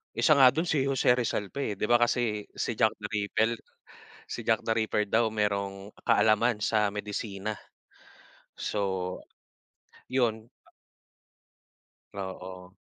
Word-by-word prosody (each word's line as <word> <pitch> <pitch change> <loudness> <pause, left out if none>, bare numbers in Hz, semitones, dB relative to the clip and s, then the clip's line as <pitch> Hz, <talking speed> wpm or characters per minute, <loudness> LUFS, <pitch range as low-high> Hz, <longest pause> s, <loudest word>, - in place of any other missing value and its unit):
isa 155 - +4
nga 130 -2 +9
dun 160 +6 -1
si 150 -5 +2
Jose 135 -2 +3
Rizal 110 -4 -1
pa, 140 - -3
eh, 105 - -2
'di - - +1
ba, 120 - +5
kasi 120 -3 +1
si - - -2
Jack - - +3
the - - -4
Rippel 110 +2 +1 0.7
si - - -5
Jack - - +2
the 115 - +1
Ripper 110 -1 +1
daw 115 0 +3
merong 100 -1 -2 0.2
kaalaman 110 +2 +3
sa 105 -2 +2
medisina, 105 0 -4 1.0
so, 95 -3 -2 1.0
'yun. 115 -3 0 1.6
Oo. 95 -2 -7
110 Hz, 125 wpm, -28 LUFS, 100-120 Hz, 1.6 s, nga